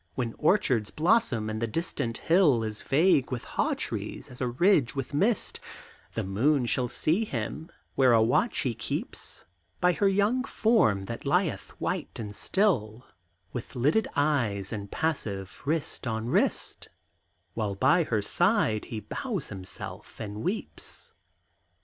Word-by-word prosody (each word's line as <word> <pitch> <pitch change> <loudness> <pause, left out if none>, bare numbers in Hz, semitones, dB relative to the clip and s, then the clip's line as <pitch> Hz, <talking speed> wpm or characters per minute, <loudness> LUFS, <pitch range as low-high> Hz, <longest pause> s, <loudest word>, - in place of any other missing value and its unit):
When 120 -3 -2
orchards 140 - +2
blossom 160 - +2
and 110 +1 -3
the 115 - +1
distant 115 -4 -2
hill 160 -9 +4
Is 110 -1 -4
vague 145 -2 +3
with 125 -2 -3
haw - - 0
trees - - -5
as 125 - -11
a 125 - +1
ridge 140 - +3
with 135 0 -4
mist, 205 +9 +1 0.5
The - - -2
moon 125 +8 +2
shall 125 +1 0
see 165 - +1
him 150 - -4 0.2
where 130 -2 +4
a 115 - +6
watch 125 - +2
he 125 -4 0
keeps 105 -2 -5 0.3
By 180 0 +4
her 200 - +2
young 205 +6 +2
form 215 - +2
that 115 +4 -6
lieth 165 +4 0
white - - -3
and 105 -2 -6
still, 125 - 0 0.5
With 125 +2 -6
lidded 150 - +2
eyes 120 -10 +1
and 100 -2 -5
passive 100 - -3
wrist 155 -4 -2
on 110 +1 -2
wrist, - - 0 0.6
While 105 -3 -2
by 170 - +4
her 110 -6 0
side 175 - +2
he 110 -2 -5
bows 195 - -4
himself 95 -2 -9
and 105 -1 -5
weeps. 205 - -5
130 Hz, 145 wpm, -28 LUFS, 110-175 Hz, 0.6 s, a